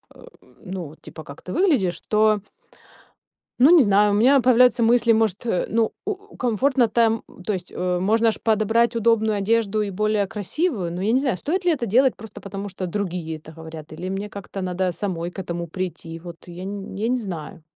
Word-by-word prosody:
э 480 - -15 0.4
Ну, 180 -5 -6
типа, 160 - -10
как 140 -1 -11
ты 180 - -6
выглядишь, 285 - +2
то 215 0 +3 1.2
Ну, 270 - +7
не 330 -6 +7
знаю, 205 0 +4
у 205 - +2
меня 260 +5 +5
появляются 250 -1 +5
мысли, 235 0 +4
может, 220 -2 0
э, 205 -7 0
ну, 225 0 +1
у 410 -1 -6
комфортно 250 +1 +2
там, 225 0 +2 0.2
то 210 - 0
есть, 180 -1 -6
э, 180 0 -1
можно 225 +4 +3
ж - - -5
подобрать 225 +2 +2
удобную 220 -2 +2
одежду 215 +1 +1
и 205 - -2
более 210 +1 0
красивую, 215 - -2
но 175 +2 -4
я 215 +4 +1
не 255 - +4
знаю, 260 -9 0
стоит 355 - -2
ли 350 - +3
это 265 -6 -1
делать 250 +5 +3
просто 215 -1 -10
потому, 200 +1 -6
что 190 -1 -5
другие 175 -4 -3
это 155 +1 -14
говорят, 160 -1 -10
или 180 +4 -5
мне 195 +2 -4
как-то 200 -1 -8
надо 185 0 -1
самой 175 -2 -3
к - - -9
этому 170 -2 -4
прийти? 165 -1 -5
Вот, 170 0 -11
я 175 +1 -8
н 195 0 -6
я 210 +3 -1
не 250 +1 +1
знаю. 175 -8 -7
205 Hz, 200 wpm, -23 LUFS, 180-230 Hz, 1.2 s, Ну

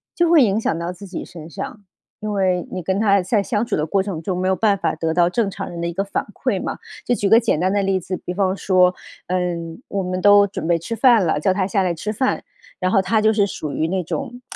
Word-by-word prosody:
就 345 -1 +2
会 310 -6 +7
影 210 0 +2
响 165 -6 -1
到 170 +1 -3
自 180 +3 -11
己 185 - -6
身 165 -3 -11
上。 215 - -7 0.3
因 215 0 -4
为 185 -3 0
你 185 - -4
跟 190 +4 -1
她 200 -3 +4
在 200 +2 +1
相 210 +1 -1
处 - - -1
的 150 - 0
过 195 +4 +1
程 190 -5 -4
中， 185 0 -2
没 185 +1 -1
有 190 - +2
办 210 -1 +2
法 - - -1
得 160 0 -1
到 175 0 +3
正 220 +2 0
常 - - -6
人 170 - -7
的 170 - -2
一 170 - -4
个 195 +3 -1
反 200 - -3
馈 - - -1
嘛， - - -4 0.3
就 245 - +1
举 205 -4 0
个 225 +1 +7
简 220 -9 0
单 185 +2 +1
的 200 -1 +1
例 190 -1 +1
子， 185 +1 -4
比 180 - -6
方 190 0 0
说， 180 -1 +3 0.3
呃， 185 +1 0 0.5
我 200 - -1
们 185 0 -3
都 205 0 +6
准 190 - -6
备 170 -1 +2
吃 230 +8 -5
饭 235 -5 +5
了， 160 -2 +1
叫 185 +4 +2
她 190 -1 0
下 195 -1 +1
来 175 -2 0
吃 210 +6 -4
饭， 260 +5 -1 0.4
然 185 0 0
后 195 - +4
她 215 +4 +1
就 220 0 +4
是 205 -2 +3
属 155 -6 -5
于 160 - 0
那 185 +1 -1
种 245 - -5
190 Hz, 295 characters per minute, -21 LUFS, 180-210 Hz, 0.5 s, 会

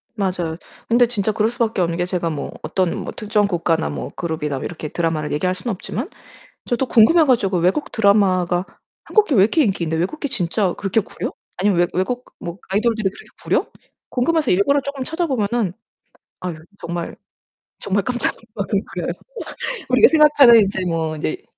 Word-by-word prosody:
맞아요. 180 -5 -2 0.3
근데 240 +1 +4
진짜 215 -2 -1
그럴 220 +1 +1
수 240 +1 -12
밖에 220 -5 +1
없는게 170 +1 0
제가 180 -2 -2
뭐 150 -3 -4
어떤 185 -3 -1
특정 210 -2 +1
국가나 165 -3 0
뭐 - - -5
그룹이나 155 -5 -3
이렇게 155 +1 -5
드라마를 160 -2 -2
얘기할 180 +5 0
수는 185 +6 -4
없지만 230 - -5 0.6
저도 250 +1 -1
궁금해 310 +10 +6
가지고 200 -8 +2
외국 185 - 0
드라마가 190 -4 +3 0.4
'한국 430 -1 +3
게 280 - 0
왜 190 - +6
이렇게 295 +10 +3
인기 195 -7 0
있는데? 160 0 -1
외국 195 - -2
게 285 - -2
진짜 185 -1 0
그렇게 200 +2 +1
구려? - - -6 0.2
아니면 185 -1 +2
외 175 - +4
외국 245 +7 -1
뭐 175 +2 -7
아이돌들이 215 0 +1
그렇게 - - -14 0.2
구려?' - - +1 0.4
궁금해서 305 +3 +1
일부러 200 +10 +3
쪼금 275 -1 -5
찾아보면은 240 - -1 0.7
아유 175 -3 -4 0.2
정말, 170 0 -5 0.6
정말 200 0 0
깜짝 250 -1 0
놀랄 - - -22
만큼 - - 0
구려요. - - -3 0.8
우리가 455 - +6
생각하는 295 -7 +7
인제 195 -2 0
뭐 160 -2 -1
인제 365 - -3
200 Hz, 385 characters per minute, -20 LUFS, 175-240 Hz, 0.8 s, 생각하는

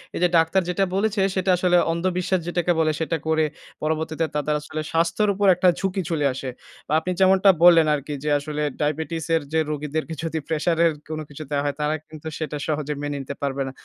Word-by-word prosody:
এইযে 180 - +3
ডাক্তার 165 +4 +3
যেটা 195 +2 +1
বলেছে, 205 0 +1
সেটা 190 0 0
আসলে 180 0 +3
অন্ধ 170 +2 -3
বিশ্বাস 185 0 0
যেটাকে 175 0 0
বলে, 155 -1 +3
সেটা 160 0 -1
করে, 160 0 +2 0.4
পরবর্তীতে 160 +1 -1
তাদের 150 +1 0
আসলে 155 +1 -5
স্বাস্থ্যের 170 +6 +1
উপর 200 +1 +1
একটা 180 +1 +2
ঝুঁকি 190 0 -1
চলে 155 -3 0
আসে। 130 0 -5 0.4
বা 150 - -2
আপনি 180 +3 -3
যেমনটা 190 +1 +5
বললেন 165 -3 +7
আরকি 145 +1 -5
যে, 150 - -1
আসলে 150 +1 -4 0.2
ডায়াবেটিস 160 +2 -2
এর 160 - +1
যে 160 - +3
রোগীদেরকে 150 +2 -3
যদি 160 -1 -2
প্রেশার 160 +1 0
এর 165 - +4 0.2
কোনো 155 0 -4
কিছু 145 +2 -8
দেওয়া 145 -1 0
হয়, 145 - -1
তারা 150 +1 +1
কিন্তু 155 0 -9
সেটা 155 -2 -4
সহজে 150 -1 -1
মেনে 145 -1 -3
নিতে 140 +1 -6
পারবে 140 -1 -2
না। - - -5
160 Hz, 205 wpm, -23 LUFS, 150-175 Hz, 0.4 s, বললেন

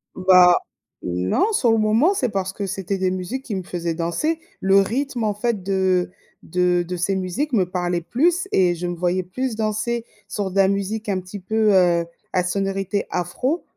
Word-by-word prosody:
Bah 180 -1 +6 0.5
non, 90 - 0
sur 245 - +3
le 225 - +3
moment, 220 - +3
c'est 260 -10 0
parce 190 -2 -2
que 200 - -4
c'était 195 +1 -3
des 185 -1 0
musiques 185 +9 -4
qui 215 - -3
me 190 - -3
faisaient 170 -2 -3
danser. 175 - -1 0.2
Le 195 +1 +4
rythme, 245 +4 -1
en 210 -1 +1
fait, 210 -2 -2
de 190 -2 +1 0.3
de 180 +1 +1
de 180 +1 -5
ces 190 +3 0
musiques 190 +11 -2
me 195 -6 +3
parlait 175 -1 -1
plus 345 - +1
et 180 -2 +3
je 175 +1 -4
me 175 - -3
voyais 180 +2 0
plus 245 +7 -3
danser 220 +2 -1 0.2
sur 200 -1 -3
de - - -10
la 195 -1 +5
musique 200 +3 -2
un 195 -2 0
petit 185 +3 -9
peu, 215 +3 +1
heu, 175 -2 +4 0.3
à 180 -1 +2
sonorité 195 +1 -1
afro 215 - -2
195 Hz, 190 wpm, -22 LUFS, 180-220 Hz, 0.5 s, Bah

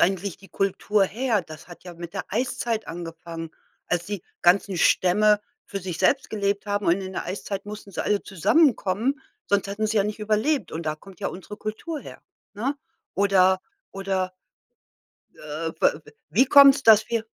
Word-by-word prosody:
eigentlich 190 0 +1
die 195 0 -17
Kultur 200 +1 +1
her? 225 0 0
Das 155 -2 -12
hat 175 0 -13
ja 180 -1 -10
mit 170 +2 -9
der - - -3
Eiszeit 235 -1 -2
angefangen, 165 -1 -7 0.4
als 175 0 -1
die 205 -3 -4 0.2
ganzen 185 +2 +3
Stämme 210 +5 +4 0.2
für 195 - -5
sich 180 -3 -5
selbst 275 -1 +2
gelebt 200 -1 -1
haben 205 0 -1
und 175 +3 +3
in 190 0 -6
der - - -3
Eiszeit 195 +1 -5
mussten 210 -1 -8
sie - - -3
alle 205 -1 +1
zusammenkommen, 235 - +2 0.3
sonst 200 -1 +1
hätten 205 +2 -2
sie 220 - -1
ja 200 - +4
nicht 210 +1 -4
überlebt 215 - 0
und 160 0 -5
da 155 - 0
kommt 185 +3 -16
ja - - -2
unsere 190 +3 -7
Kultur 225 +11 -5
her, - - -11 0.3
ne? 255 +8 -2 0.4
Oder 190 -1 +4 0.3
oder 190 -1 -2 1.0
äh, 155 +2 -5
b - - +5
w - - -15 0.2
wie 260 - +5
kommt's, 280 0 +7
dass 220 -1 +6
wir 230 -1 -1
200 Hz, 175 wpm, -24 LUFS, 180-215 Hz, 1.0 s, kommt's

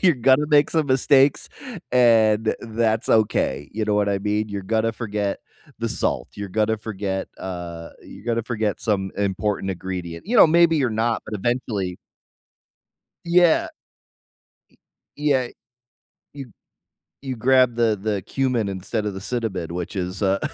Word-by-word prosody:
you're 175 -5 +5
gonna 130 +4 +3
make 145 -1 +4
some 160 -2 +1
mistakes, 135 +1 +3 0.4
and 110 -3 +4
that's 110 -1 -1
okay. 75 -10 +1
You 110 +1 -2
know 105 -1 0
what 105 0 +2
I 100 -1 0
mean? 105 +2 -1
You're 100 -1 -5
gonna 110 +3 0
forget 105 -3 -3 0.4
the - - -2
salt, - - -2
you're 100 -1 -6
gonna 110 +2 +1
forget, 100 -3 -4
uh, 85 -3 -6
you're - - -13
gonna 115 0 0
forget 110 -3 -2
some 95 -3 -1
important 100 0 -1
ingredient. 90 - -6
You 240 +4 0
know, 210 - +9
maybe 165 0 +4
you're 135 -5 +1
not, 115 +1 0
but - - -6
eventually 105 -5 -2 1.3
Yeah. 170 -1 +4
Y - - -7 1.5
yeah. 140 -4 +1 0.9
You 135 -4 -9 0.7
you 130 -2 -5
grab 130 +1 +3
the 115 -3 +1
the 105 -2 -2
cumin 125 -6 -1
instead 100 +3 -3
of 105 - -3
the 95 - -6
cinnamon, 95 -7 -3
which 90 +2 -5
is 90 +2 -3
a 95 0 +2
110 Hz, 150 wpm, -22 LUFS, 100-125 Hz, 1.5 s, know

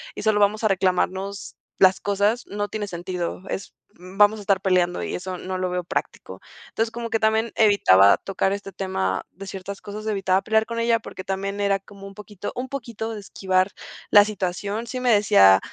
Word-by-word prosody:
y - - -6
solo 215 -1 +2
vamos 210 +2 +2
a - - +6
reclamarnos 190 +1 -1 0.2
las 190 0 +5
cosas, 205 +4 0
no 205 0 -3
tiene 210 -1 -4
sentido. 175 0 -5
Es 195 - -5 0.2
vamos 205 +4 +2
a - - -8
estar 195 -1 +1
peleando 180 -2 +1
y - - -4
eso 185 0 -5
no 185 +1 -5
lo 185 0 -1
veo 180 0 -2
práctico. 175 - -5 0.3
Entonces, 225 0 -1
como 230 0 -5
que 225 - 0
también 220 +1 +1
evitaba 100 - +6
tocar 195 0 -1
este 200 -1 -6
tema 95 - -2
de 195 +3 -10
ciertas 195 +1 -7
cosas, 210 +1 -8
evitaba 195 -2 +1
pelear 220 +1 +2
con 230 0 -4
ella 230 0 +2
porque 185 - -9
también 195 +1 -3
era 200 -1 +1
como 195 0 -13
un 195 - -11
poquito 205 -1 -8
un 255 +1 -4
poquito 230 -4 -5
de 215 - -6
esquivar 190 -1 0 0.4
la 205 -2 +8
situación. 205 +2 -3
Sí 255 +3 -4
me 250 -1 +3
decía 95 - +6
200 Hz, 195 wpm, -23 LUFS, 185-215 Hz, 0.4 s, la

